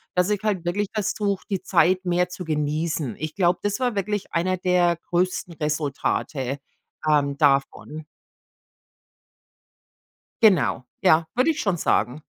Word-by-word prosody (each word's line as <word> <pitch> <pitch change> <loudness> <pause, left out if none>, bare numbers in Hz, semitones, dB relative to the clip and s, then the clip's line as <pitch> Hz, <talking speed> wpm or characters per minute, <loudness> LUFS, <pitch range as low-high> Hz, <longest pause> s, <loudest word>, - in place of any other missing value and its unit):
dass 180 +2 +2
ich 210 -2 0
halt 200 -5 -1
wirklich 200 +4 -1
versuche, 205 -2 -1
die 195 -3 -1
Zeit 185 0 +2
mehr 180 0 +1
zu 180 0 -7
genießen. 150 -3 -2
Ich 155 0 -5
glaube, 180 -2 +2
das 205 +3 -1
war 250 -3 0
wirklich 205 0 -2
einer 185 +2 0
der 175 -1 +2
größten 180 -1 -1
Resultate, 145 -3 -2 0.5
ähm, 140 -2 +2
davon. 145 +1 +1 2.4
Genau, 185 - +4 0.2
ja, 160 +1 +4
würde 255 +7 +3
ich 310 - -5
schon 195 -4 0
sagen. 125 -1 0
175 Hz, 130 wpm, -24 LUFS, 150-195 Hz, 2.4 s, Genau